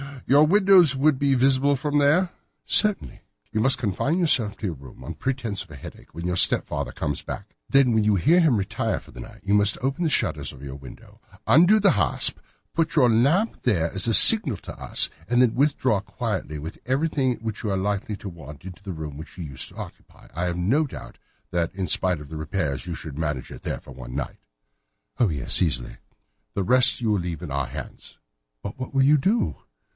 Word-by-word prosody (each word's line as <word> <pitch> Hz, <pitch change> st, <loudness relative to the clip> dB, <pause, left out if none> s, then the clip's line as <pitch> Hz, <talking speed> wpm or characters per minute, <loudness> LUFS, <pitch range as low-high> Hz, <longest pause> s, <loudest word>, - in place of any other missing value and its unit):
Your 145 Hz, +3 st, +4 dB
windows 190 Hz, -5 st, +5 dB
would 140 Hz, 0 st, +2 dB
be 140 Hz, -1 st, +2 dB
visible 135 Hz, +2 st, +2 dB
from 145 Hz, +2 st, -2 dB
there?" 155 Hz, +6 st, +2 dB, 0.3 s
"Certainly." 210 Hz, -2 st, +1 dB, 0.3 s
"You 110 Hz, -, -2 dB
must 135 Hz, +3 st, +3 dB
confine 120 Hz, -, -1 dB
yourself 125 Hz, -, +1 dB
to -, -, -7 dB
your 85 Hz, -, -4 dB
room, 65 Hz, -2 st, -14 dB
on -, -, -7 dB
pretence 125 Hz, -7 st, -3 dB
of 95 Hz, -, -12 dB
a 75 Hz, -, -11 dB
headache, 70 Hz, -, -13 dB
when 85 Hz, +1 st, -6 dB
your 90 Hz, 0 st, -1 dB
stepfather -, -, +2 dB
comes 75 Hz, -1 st, -4 dB
back. 100 Hz, +1 st, -9 dB
Then 135 Hz, -3 st, +4 dB
when 110 Hz, -1 st, +2 dB
you 105 Hz, -1 st, +3 dB
hear 155 Hz, -, +3 dB
him 160 Hz, -8 st, +3 dB
retire 110 Hz, +2 st, -2 dB
for -, -, -18 dB
the -, -, -13 dB
night, 110 Hz, -1 st, -12 dB
you 100 Hz, -, -1 dB
must 105 Hz, 0 st, +3 dB
open 135 Hz, +7 st, -2 dB
the 165 Hz, -, +1 dB
shutters -, -, -1 dB
of 65 Hz, -, -14 dB
your 70 Hz, -1 st, -8 dB
window, 70 Hz, -2 st, -15 dB, 0.3 s
undo 175 Hz, +9 st, +5 dB
the 200 Hz, -2 st, +4 dB
hasp, -, -, +2 dB, 0.4 s
put 165 Hz, 0 st, -1 dB
your 130 Hz, -6 st, +4 dB
lamp 150 Hz, -, +1 dB
there 85 Hz, -9 st, 0 dB
as 95 Hz, +3 st, -2 dB
a 115 Hz, -, +1 dB
signal 145 Hz, -, +9 dB
to -, -, -11 dB
us, -, -, +1 dB, 0.2 s
and 120 Hz, +1 st, +1 dB
then 125 Hz, -3 st, +3 dB
withdraw 135 Hz, -6 st, +1 dB
quietly 95 Hz, -7 st, -5 dB
with 80 Hz, +3 st, -8 dB
everything 135 Hz, -1 st, 0 dB
which 110 Hz, -2 st, -6 dB
you 105 Hz, -, -2 dB
are 95 Hz, -, -1 dB
likely 100 Hz, +2 st, -3 dB
to 100 Hz, -, -8 dB
want 75 Hz, -5 st, -12 dB
into 95 Hz, +1 st, -10 dB
the 100 Hz, -2 st, -7 dB
room 75 Hz, -3 st, -7 dB
which 80 Hz, -, -12 dB
you 90 Hz, -, -6 dB
used 70 Hz, -4 st, -6 dB
to -, -, -18 dB
occupy. -, -, -12 dB
I 85 Hz, +4 st, -3 dB
have 90 Hz, -1 st, -3 dB
no 130 Hz, -, +1 dB
doubt -, -, -11 dB, 0.3 s
that, 85 Hz, 0 st, -2 dB
in 95 Hz, -2 st, -3 dB
spite 90 Hz, -4 st, +1 dB
of 75 Hz, -, -12 dB
the 80 Hz, -, -7 dB
repairs, 80 Hz, -2 st, -4 dB
you 85 Hz, -, -4 dB
could 75 Hz, -2 st, -9 dB
manage 75 Hz, -5 st, -3 dB
there -, -, -6 dB
for -, -, -14 dB
one -, -, -10 dB
night." 70 Hz, -, -5 dB, 0.8 s
"Oh, 115 Hz, -, +3 dB
yes, 70 Hz, -6 st, 0 dB
easily." 65 Hz, -9 st, -2 dB, 0.6 s
"The 100 Hz, -, -1 dB
rest 125 Hz, +4 st, +4 dB
you 110 Hz, -2 st, 0 dB
will 105 Hz, -, +1 dB
leave 85 Hz, -3 st, -6 dB
in -, -, -7 dB
our 70 Hz, -1 st, -2 dB
hands." -, -, -10 dB, 0.5 s
"But 100 Hz, +5 st, -8 dB
what 130 Hz, -, -7 dB
will 135 Hz, -, +4 dB
you 150 Hz, +3 st, +5 dB
do?" 200 Hz, -, 0 dB
110 Hz, 215 wpm, -23 LUFS, 85-140 Hz, 0.8 s, signal